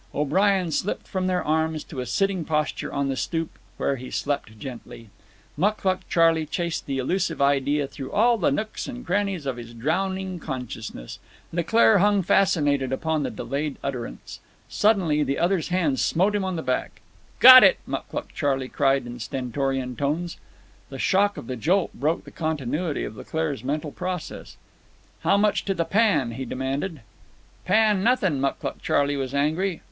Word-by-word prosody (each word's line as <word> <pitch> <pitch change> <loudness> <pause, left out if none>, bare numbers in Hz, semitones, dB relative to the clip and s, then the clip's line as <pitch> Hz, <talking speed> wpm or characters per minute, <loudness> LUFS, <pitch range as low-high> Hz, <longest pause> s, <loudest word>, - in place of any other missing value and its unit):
O'Brien 180 +4 +2
slipped 180 - -2
from 185 -2 -2
their 180 -1 0
arms 160 0 0
to 145 - -8
a 125 - -4
sitting 190 - 0
posture 150 -1 -2
on 140 0 -1
the 135 - -1
stoop, 165 +4 -2 0.3
where 140 - 0
he 130 +1 -8
slept 140 -6 -3
gently. 115 -2 -9 0.4
Mucluc 190 +1 +1
Charley 165 -2 +3
chased 170 +2 -3
the 135 -1 -2
elusive 155 +9 -1
idea 140 +1 +2
through 135 -1 -8
all 230 +2 +3
the 170 - +3
nooks 215 +10 -3
and 250 -2 -7
crannies 195 -4 -1
of 130 -2 -2
his 120 0 -9
drowning 185 +7 -2
consciousness. 125 - -6 0.3
Leclaire 200 +5 +4
hung 205 0 +3
fascinated 145 -8 +2
upon 155 +3 -1
the - - -1
delayed 145 +1 -4
utterance. 130 -4 -6 0.3
Suddenly 185 -8 +2
the 140 -1 0
other's 170 0 +1
hand 165 -8 0
smote 175 +11 +2
him 205 -1 0
on 185 -1 -2
the 160 - -4
back. 130 - -2 0.4
"Got 255 0 +11
it!" - - +6
Mucluc - - -5
Charley 135 -3 -1
cried 135 -2 +1
in 120 0 -8
stentorian 130 +1 -2
tones. 155 +6 -2 0.5
The - - -7
shock 200 +1 +2
of - - -7
the 130 - -4
jolt 170 - +1
broke 155 +5 -1
the - - -13
continuity 155 0 -2
of - - -6
Leclaire's 150 0 -3
mental 150 +3 -2
process. 180 0 -6 0.6
"How - - +2
much 205 0 +2
to 195 - -1
the 165 -1 0
pan?" 200 - +2
he 130 +3 -5
demanded. 135 +6 -3 0.6
"Pan 215 -3 +3
nothin'!" 195 - +2
Mucluc 135 - -2
Charley 145 0 +1
was 135 -1 -3
angry. 160 +6 0
155 Hz, 160 wpm, -24 LUFS, 135-190 Hz, 0.6 s, Got